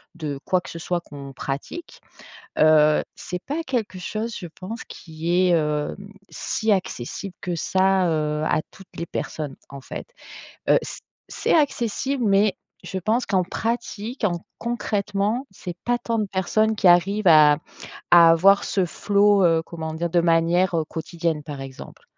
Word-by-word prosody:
de 150 -4 -5
quoi 185 - +2
que - - -11
ce 165 - -7
soit 175 +1 -2
qu'on 140 -4 -10
pratique, 140 - -6 0.6
heu, 155 -1 +5
c'est 180 - -6
pas 310 +4 -3
quelque 235 -10 -2
chose 215 +4 -4
je 175 - -7
pense 190 +8 -8
qui 160 +1 -6 0.2
est, - - +4
heu, 150 -2 -1 0.3
si 220 0 -2
accessible 185 - -3
que 175 -2 -3
ça, 190 +1 +2
heu, 150 -1 0
à 155 - +1
toutes 195 - -15
les 170 - -4
personnes, 150 -4 -4
en 140 0 -9
fait, - - -8 0.6
heu, - - +6
c - - -7 0.3
c'est - - 0
accessible 270 -3 0
mais 200 +1 +3 0.3
je 190 - -4
pense 220 +7 0
qu'en 185 -3 +1
pratique, 230 +3 -3
en 175 -4 -1
concrètement, 210 0 -1
c'est 180 -2 -7
pas 245 0 +2
tant 230 -1 -2
de 215 - 0
personnes 210 +3 +1
qui 200 -3 +4
arrivent 190 +3 +4
à 150 -2 +7 0.5
à 170 -1 +9
avoir 195 +5 +5
ce 190 -3 0
flow, 205 +2 +3
heu, 165 -1 +3
comment 160 -2 -6
dire? 170 +2 -2
De 175 +1 +3
manière 170 +2 +2
quotidienne, 165 -1 -3
par 145 -2 -7
exemple. 135 -1 -10
180 Hz, 160 wpm, -23 LUFS, 160-210 Hz, 0.6 s, à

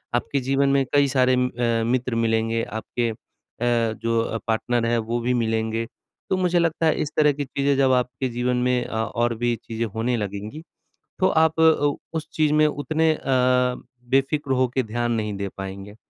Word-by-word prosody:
आपके 140 +3 0
जीवन 135 0 +2
में 135 -1 +2
कई 145 -1 +4
सारे 130 -1 +3
म 125 0 +2
अ, 115 -2 0
मित्र 125 -2 0
मिलेंगे, 115 0 +1
आपके 115 +2 -3
अ, 115 +1 -3
जो 115 -1 0
पार्टनर 115 +1 0
हैं, 120 0 +1
वो 115 +2 -2
भी 125 +2 0
मिलेंगे। 115 -1 -1 0.4
तो 190 - +1
मुझे 180 -1 +2
लगता 165 -1 0
है 155 - +3
इस 150 - -3
तरह 150 -1 +5
की 145 0 -4
चीज़ें 140 +1 0
जब 135 -1 +3
आपके 125 +1 -1
जीवन 125 +1 -1
में 125 -1 +1
अ, - - -9
और 120 +1 -1
भी 120 +1 0
चीज़ें 115 0 -3
होने 120 +2 0
लगेंगी, 105 - -5 0.6
तो 185 - +4
आप 160 0 +2
अ, 155 -3 +4 0.2
उस 155 - -6
चीज़ 155 -1 +2
में 155 0 +4
उतने 155 +2 +1
अ, - - -11 0.9
बेफ़िक्र 135 +1 +1
होके 130 +1 +1
ध्यान 120 +2 -2
नहीं 105 -2 -1
दे 100 0 -3
पाएँगे। 95 +1 -7
125 Hz, 185 wpm, -23 LUFS, 115-140 Hz, 0.9 s, तरह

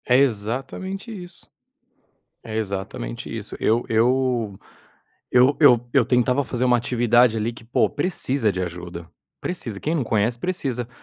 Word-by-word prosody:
É 125 - +4
exatamente 135 - -1
isso. 180 -5 -9 1.0
É 110 - -6
exatamente 95 - -4
isso. - - -6
Eu 115 +2 +2
eu 120 -2 +1 0.7
eu 125 +3 +5
eu 120 -5 +6
eu 135 -4 +4
tentava 125 +3 +2
fazer 125 0 -2
uma 125 -1 +4
atividade, 120 0 +3
ali, 110 +2 -1
que 115 - -13
pô, 115 - +1
precisa 140 - 0
de 95 -1 -2
ajuda, 85 -1 -7 0.3
precisa. 115 - -4
Quem 155 - -1
não 150 -6 0
conhece, 110 +2 0
precisa. 130 -7 -2
120 Hz, 140 wpm, -23 LUFS, 110-135 Hz, 1.0 s, eu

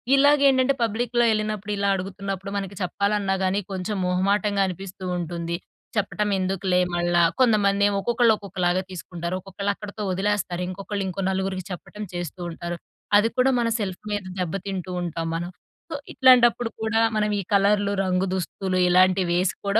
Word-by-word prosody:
ఇలాగేంటంటే, 275 -2 +5
పబ్లిక్‌లో 240 +2 +1
యెళ్ళినప్పుడు, 215 -1 -1
ఇలా 200 0 +1
అడుగుతున్నప్పుడు, 195 +1 -5
మనకి 195 -1 -5
చెప్పాలన్నా 200 +1 0
గానీ 190 +2 +1
కొంచం 190 +2 -3
మొహమాటంగా 200 +2 +1
అనిపిస్తూ 185 +1 -7
ఉంటుంది. 170 0 -3 0.4
చెప్పటమెందుకులే 195 -3 0
మళ్ళా. 175 0 +2 0.2
కొంతమందేమో 205 -4 +3
ఒక్కొక్కళ్ళు 235 +1 +3
ఒక్కొక్కలాగా 185 -2 -1
తీసుకుంటారు. 175 0 -5
ఒక్కొక్కళ్ళక్కడతో 200 +2 -4
ఒదిలేస్తారు. 190 -2 -1
ఇంకొకళ్ళు 195 +1 -4
ఇంకో 185 +2 -4
నలుగురికి 190 -1 -2
చెప్పటం 210 +4 -7
చేస్తూ 175 0 -5
ఉంటారు. 175 +1 -5 0.4
అది 225 +2 +3
కూడా 260 +1 +4
మన 235 - +1
సెల్ఫ్ 190 -3 -4
మీద 205 -2 -1 0.2
దెబ్బతింటూ 185 +1 -3
ఉంటాం 165 -1 -3
మనం. 175 +1 -3 0.4
సో, - - -2 0.2
ఇట్లాంటప్పుడు 245 -2 +5
కూడా 220 0 +1 0.2
మనవీ 210 -1 +1
కలర్లు, 200 0 +3
రంగు 185 0 +1
దుస్తులు 185 0 -2
ఇలాంటివేసి 185 0 +3
కూడా 200 +2 +3
195 Hz, 130 wpm, -24 LUFS, 185-210 Hz, 0.4 s, ఇలాగేంటంటే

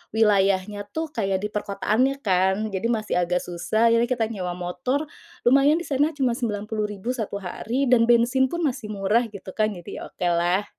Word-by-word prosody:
wilayahnya, 200 -2 +2
tuh 320 +7 -3
kayak 195 -4 0
di - - 0
perkotaannya 210 +6 0
kan. 190 0 +3 0.2
Jadi 190 +5 -1
masih 220 -2 -1
agak 180 +1 0
susah. 220 +6 +1
Jadi, 230 +1 +3
kita 240 -3 +1
nyewa 180 -4 -3
motor, 180 +10 -2 0.5
lumayan 275 +4 +5
di 345 - -4
sana, 290 +2 +1
cuma 260 -4 +2
Rp90.000 215 -2 -2 0.2
1 220 -5 -4
hari, 225 +8 -2
dan 230 -2 +5
bensin 240 +3 +4
pun 345 0 -3
masih 250 -6 -2
murah, 205 +5 +2
gitu 200 -2 -9
kan. 215 0 +1
Jadi 175 -1 -8
oke 180 - -4
lah. 175 +4 +1
215 Hz, 170 wpm, -24 LUFS, 190-245 Hz, 0.5 s, lumayan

